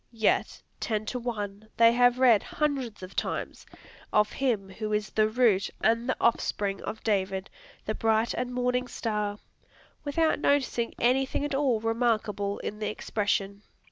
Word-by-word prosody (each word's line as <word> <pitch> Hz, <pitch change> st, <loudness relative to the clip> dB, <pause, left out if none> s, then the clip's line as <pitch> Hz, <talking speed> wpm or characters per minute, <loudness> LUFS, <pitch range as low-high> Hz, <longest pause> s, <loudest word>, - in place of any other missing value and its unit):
Yet, 225 Hz, -1 st, 0 dB, 0.2 s
ten 215 Hz, -2 st, -2 dB
to 250 Hz, -, -2 dB
one, 215 Hz, -3 st, -5 dB
they 230 Hz, 0 st, +6 dB
have 245 Hz, 0 st, +4 dB
read, 245 Hz, -5 st, +5 dB
hundreds 270 Hz, -9 st, -2 dB
of 185 Hz, -, -9 dB
times, -, -, -3 dB, 0.4 s
of 210 Hz, 0 st, +3 dB
him 225 Hz, -8 st, -1 dB
who 215 Hz, +2 st, -4 dB
is 210 Hz, 0 st, -1 dB
"the 215 Hz, 0 st, +2 dB
root 220 Hz, -5 st, +3 dB
and 230 Hz, +3 st, +1 dB
the -, -, +1 dB
offspring 205 Hz, -4 st, 0 dB
of 220 Hz, -, -6 dB
David, 190 Hz, -3 st, -1 dB, 0.3 s
the 215 Hz, -, -1 dB
bright 225 Hz, +1 st, +1 dB
and 250 Hz, 0 st, -3 dB
morning 250 Hz, 0 st, 0 dB
star," 210 Hz, -4 st, -2 dB, 0.7 s
without 315 Hz, +2 st, +1 dB
noticing 265 Hz, -5 st, +1 dB
anything 265 Hz, +3 st, +1 dB
at 290 Hz, -, -3 dB
all 270 Hz, -5 st, +2 dB
remarkable 220 Hz, -3 st, 0 dB
in 210 Hz, -, -5 dB
the 215 Hz, -, -1 dB
expression. 205 Hz, -2 st, -2 dB
225 Hz, 150 wpm, -28 LUFS, 210-250 Hz, 0.7 s, they